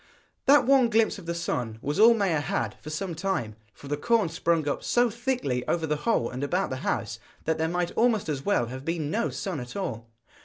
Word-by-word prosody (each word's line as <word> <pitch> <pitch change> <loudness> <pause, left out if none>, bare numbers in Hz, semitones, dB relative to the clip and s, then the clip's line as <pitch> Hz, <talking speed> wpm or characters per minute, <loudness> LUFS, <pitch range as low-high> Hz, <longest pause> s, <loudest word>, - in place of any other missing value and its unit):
That 285 +2 +6
one 265 -2 +5
glimpse 220 -2 +2
of 170 - -12
the 170 - -2
sun 120 -9 -2
was 145 +5 -3
all 230 +2 +8
Maia 190 -8 +1
had 145 - -2
for 155 - -8
some 170 +3 -3
time, 160 - -2 0.2
for 140 - -13
the 145 +1 -1
corn 225 +1 +2
sprung 165 -1 0
up 145 - -2
so 240 -1 +2
thickly 235 - -1
over 165 -2 0
the 150 -1 0
hole 170 - +2
and 125 +3 -5
about 180 +5 0
the 130 - -2
house, - - -2 0.3
that 160 0 0
there 160 0 +1
might 175 0 -1
almost 230 -5 +2
as 140 -3 -3
well 200 -12 +2
have 130 +3 -7
been 160 -2 -2
no 230 +5 0
sun 185 -7 -4
at 125 0 -8
all. 115 - -4
170 Hz, 225 wpm, -27 LUFS, 140-215 Hz, 0.3 s, all